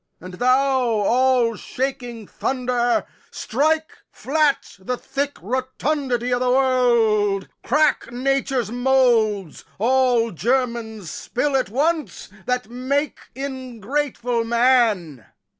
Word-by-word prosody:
And 185 +2 -10
thou, 260 +5 +2
all 240 +1 +2
shaking 245 -3 -4
thunder, 245 0 -1 0.2
Strike 310 +6 0 0.2
flat 295 0 0
the 245 +7 -3
thick 280 +3 -3
rotundity 255 +1 -1
o' 245 - +1
th' 250 0 +1
world, 235 -7 +2 0.2
Crack 300 -2 +1
Nature's 260 -2 -1
moulds, 240 - +2
all 245 0 +2
germains 230 -2 -2
spill 275 +3 -2
at 260 -5 +1
once, 305 +7 -1 0.2
That 250 -1 -1
makes 265 +5 -2
ingrateful 255 -2 -3
man! 230 - +2
250 Hz, 95 wpm, -22 LUFS, 230-265 Hz, 0.2 s, thou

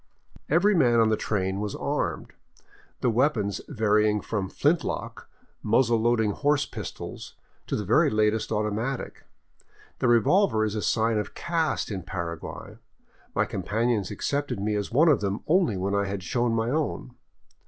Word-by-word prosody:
Every 175 +7 +4
man 120 -10 +4
on 110 -1 +4
the 110 - +3
train 95 -3 -2
was 105 -1 -3
armed, - - -3 0.7
the 125 - +2
weapons 110 -5 +1
varying 105 -4 +2
from 100 -3 -3
flint 155 - +1
lock, - - -5 0.3
muzzle 120 -3 +2
loading 110 -2 +2
horse 145 +5 +1
pistols - - -8 0.3
to - - -1
the 105 - -3
very 150 - +4
latest 110 0 +1
automatic. 110 +5 -3 0.7
The - - +1
revolver 120 - +3
is 105 - -2
a 110 - -2
sign 110 0 +1
of 105 - -5
caste 165 -7 -1
in 95 -2 -3
Paraguay; 85 -2 -6 0.6
my - - +2
companions 105 +1 -1
accepted 145 -6 -2
me 105 +2 -1
as 105 -1 -2
one 150 +8 +4
of 145 -9 +4
them 100 0 -2
only 170 - +2
when 95 +2 -2
I 100 0 +1
had 100 -1 -4
shown 120 +6 0
my 115 +1 0
own. 150 -4 -2
110 Hz, 155 wpm, -26 LUFS, 105-130 Hz, 0.7 s, Every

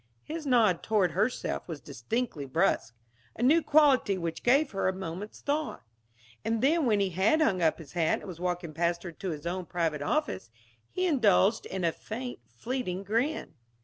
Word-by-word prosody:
His 315 -1 -6
nod 220 -9 +4
toward 205 -6 +2
herself 210 +9 -1
was 165 -4 -6
distinctly 145 - -3
brusque; 130 -6 +1 0.4
a - - -3
new 310 +7 +5
quality 285 -10 +4
which 170 -2 -4
gave 275 +4 +3
her 195 -2 0
a 190 - +1
moment's 190 +2 -7
thought. 300 +2 -2 0.6
And 225 +1 -1
then 305 +1 +3
when 210 -3 +3
he 195 -2 +1
had 195 - +3
hung 195 - +2
up 160 -1 +3
his 155 -5 -12
hat 165 -2 +1
and - - -11
was 175 -3 -8
walking 175 -2 -3
past 170 +2 0
her 175 - -6
to 185 +4 -6
his 155 -1 -6
own 180 0 -3
private 160 -4 -1
office, 285 - -1 0.4
he 370 - -1
indulged 225 - +3
in 190 -1 -4
a 165 - +3
faint, 245 +8 -6
fleeting 190 - -4
grin. 230 - -1
195 Hz, 180 wpm, -29 LUFS, 170-250 Hz, 0.6 s, new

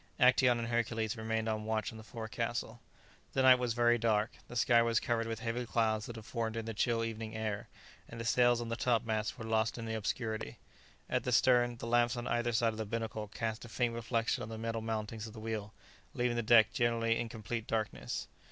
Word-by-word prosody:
Actæon 125 -1 +5
and 115 0 -3
Hercules 115 -2 0
remained 110 0 -2
on 110 -1 -1
watch 110 -1 -1
on 110 - -10
the - - -10
forecastle. 110 -2 -4 0.5
The 130 - +2
night 130 -1 +8
was 120 -2 -1
very 120 0 +4
dark; 110 -1 +2 0.2
the 120 - -9
sky 120 -1 +5
was 115 -1 +2
covered 115 -1 -1
with 115 -1 -4
heavy 115 +1 -2
clouds 110 -2 0
that 120 - -7
had 110 -2 -9
formed 115 -2 -2
in 115 - -3
the 115 - -4
chill 115 +2 +1
evening 110 -1 -4
air, 110 -2 -3 0.4
and 115 - -8
the 115 - -4
sails 120 0 +4
on 115 - -4
the 115 - -1
top 120 -1 +1
masts 110 -1 -1
were 110 - -6
lost 110 0 +1
in 115 - -5
the 110 - -3
obscurity. 110 +1 -3 0.5
At - - 0
the 125 - -1
stern, 120 -1 +4
the - - -7
lamps 120 +1 +2
on 120 - -4
either 120 0 0
side 115 0 +2
of - - -9
the 110 - -2
binnacle 110 -1 -3
cast 110 +1 -4
a 120 - -9
faint 120 +1 0
reflection 115 0 -1
on 105 - -5
the 110 - -6
metal 115 0 -3
mountings 110 0 -3
of 110 - -10
the 110 - -9
wheel, 110 -2 -4 0.4
leaving 120 -1 +1
the 120 - +1
deck 115 -1 +6
generally 115 -1 +1
in 120 -1 -2
complete 110 +1 -5
darkness. 110 -2 -2
115 Hz, 225 wpm, -33 LUFS, 110-120 Hz, 0.5 s, night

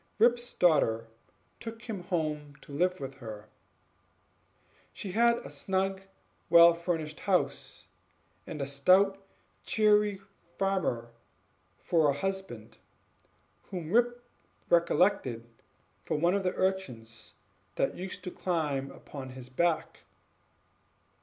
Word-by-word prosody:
Rip's 240 +2 +3
daughter 115 -10 +3 0.5
took 225 0 -8
him 220 -6 -5
home 150 -5 -2
to - - -14
live 180 +5 +1
with 135 0 -7
her; 110 -4 -9 1.4
she 195 - -6
had 235 +3 +4
a 140 - -8
snug 190 +5 -1 0.5
well 170 0 +9
furnished 165 -3 -3
house, 140 - -1 0.6
and 150 -3 -4
a - - -1
stout 185 +8 +3 0.4
cheery 210 - +3 0.4
farmer 175 -12 0 0.7
for 160 -4 +2
a 140 - 0
husband, 195 +3 -4 0.9
whom 175 -4 -5
Rip 240 +2 +2 0.5
recollected 170 - +2 0.6
for - - -1
one 170 +4 +3
of 200 - +1
the 185 -1 -1
urchins 120 -13 -3 0.4
that - - +1
used 185 0 -6
to 180 - -5
climb 150 -8 -1
upon 135 -2 -9
his 130 -1 -10
back. 165 +4 0
170 Hz, 110 wpm, -30 LUFS, 140-195 Hz, 1.4 s, well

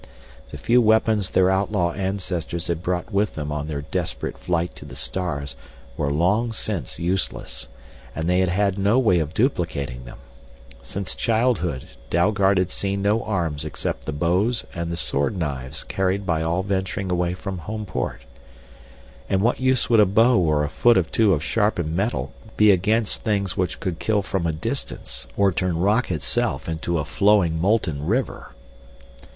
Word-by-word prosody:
The - - -8
few 125 +1 +3
weapons 110 -3 +3
their 95 0 +3
outlaw 95 -3 +1
ancestors 90 -3 -3
had 85 -1 -1
brought 90 +3 -2
with 100 +2 +1
them 75 -1 -4
on 75 0 -3
their 70 -2 -4
desperate - - -3
flight 85 0 -2
to - - -9
the - - -10
stars 70 -7 -3 0.4
were 70 0 -1
long 100 +10 +1
since 95 - -4
useless, 90 +2 -2 0.5
and 80 +1 -2
they 90 +1 +3
had 95 -1 +2
had 100 +1 +1
no 100 +5 +3
way 110 -9 +4
of 80 0 -3
duplicating 80 - -1
them. - - -10 0.6
Since 95 +10 -4
childhood 110 - 0 0.2
Dalgard 95 +2 +3
had 90 0 +1
seen 100 0 -2
no 105 +3 +2
arms 85 -8 -1
except 75 -4 -4
the - - -2
bows 90 +10 +1
and 85 0 -3
the 85 - -3
sword 70 +4 0
knives 70 -6 -3
carried 95 +1 -1
by 80 -3 0
all 85 +3 0
venturing 95 -1 -2
away 90 0 0
from 95 0 -5
Homeport. 105 +5 -4 1.1
And 95 +1 +1
what 120 - +2
use 130 -1 +2
would 115 -2 +4
a 105 - +6
bow 115 +5 +4
or 75 -4 +2
a - - 0
foot 120 +8 +4
or 95 - +4
two 105 +6 +2
of 75 -2 -1
sharpened 90 -8 0
metal 75 - -1 0.2
be 105 -1 +7
against 105 +4 +1
things 100 -4 -1
which 90 -2 -1
could 90 -3 -3
kill 105 -2 +1
from 95 -3 -1
a - - +1
distance 70 -4 -4
or 100 -1 +4
turn 90 -2 -1
rock 105 +8 +2
itself 70 -8 -1
into 80 +1 -2
a 75 - -1
flowing, 95 -3 +3
molten 90 -7 +1
river? 120 - -2
90 Hz, 170 wpm, -23 LUFS, 80-105 Hz, 1.1 s, be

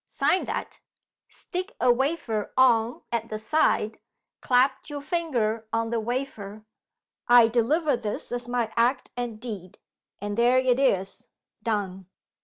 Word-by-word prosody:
Sign 370 - +1
that; - - -5 0.5
stick 370 +2 -6
a 245 0 +5
wafer 250 -5 -1
on 240 -2 +3
at 230 -1 -2
the 215 - -3
side; 220 -3 +1 0.4
clap 260 +3 +2
your 290 -1 -4
finger 240 -10 -1
on 225 0 -1
the 235 - +1
wafer; 220 -3 -4 0.6
'I 240 -2 +7
deliver 285 +7 +2
this 220 -3 -4
as 245 0 -3
my 240 -2 -1
act 245 +3 +1
and 240 -3 -4
deed;' 205 -7 -7 0.4
and 205 +2 -3
there 245 +2 +5
it 255 -1 +3
is 195 -8 0 0.3
done!" 195 -5 -2
235 Hz, 135 wpm, -26 LUFS, 220-260 Hz, 0.6 s, I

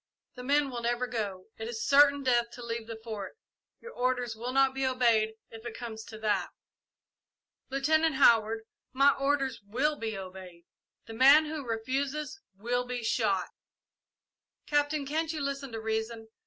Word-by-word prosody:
The 250 - -9
men 280 +2 +2
will 240 -1 -4
never 240 +1 0
go. 205 -6 -4
It 220 - -4
is 230 -1 -4
certain 285 0 +6
death 240 -2 +2
to 240 -1 -9
leave 230 -1 -4
the 225 -1 -7
Fort. 215 - -6 0.4
Your 470 - -9
orders 250 - -1
will 240 +3 -4
not 270 0 +3
be 270 0 -2
obeyed, 235 -4 +2 0.2
if 225 0 -11
it 240 -2 -7
comes 225 -2 -7
to 220 +1 -10
that." 215 -1 0 1.2
"Lieutenant 310 +3 +2
Howard, 225 -4 +4 0.3
my 275 +2 +6
orders 275 -4 0
will 260 +10 0
be 220 -5 -4
obeyed. 185 -2 -10 0.4
The 225 - -9
man 275 +6 +7
who 305 -1 -5
refuses 270 - -3 0.2
will 245 +4 -1
be 245 -1 -5
shot." 205 -5 +1 1.2
"Captain, 290 0 +1
can't 315 +3 -1
you 315 - -4
listen 275 -1 -3
to 225 - -5
reason? 220 0 -3
245 Hz, 160 wpm, -29 LUFS, 220-275 Hz, 1.2 s, man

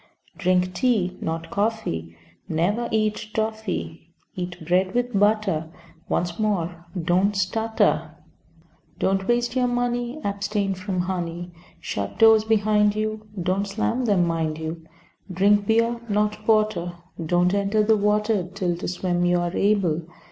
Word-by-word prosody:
Drink 185 -1 +1
tea, 185 -4 +1
not 165 0 -4
coffee; 200 - -2 0.3
Never 190 +9 0
eat 215 0 0
toffy. 210 - -3 0.3
Eat 180 -2 -6
bread 185 +4 +1
with 245 0 0
butter. 205 -6 +2 0.4
Once 175 +1 -1
more, 175 -5 -1
don't 185 +4 +2
stutter. 220 +4 0 0.8
Don't 190 0 0
waste 240 0 +1
your 250 -1 +2
money, 245 +2 -1
Abstain 200 0 -1
from 185 -1 -2
honey. 175 -1 -4 0.3
Shut 100 0 -4
doors 220 -1 +7
behind 210 -1 +3
you, 215 0 -3
(Don't 185 +3 0
slam 230 +5 -1
them, 195 -6 +3
mind 160 -2 -1
you.) 160 +1 -5 0.5
Drink 200 +2 +3
beer, 230 +1 +2
not 210 +1 0
porter. 215 -6 +2 0.3
Don't 175 +3 +2
enter 200 +2 +2
the 220 +1 +4
water 210 -2 +1
Till 185 -3 -1
to - - -5
swim 175 0 -1
you 175 0 +3
are 175 +1 -2
able. 195 -6 +2
200 Hz, 135 wpm, -24 LUFS, 175-215 Hz, 0.8 s, doors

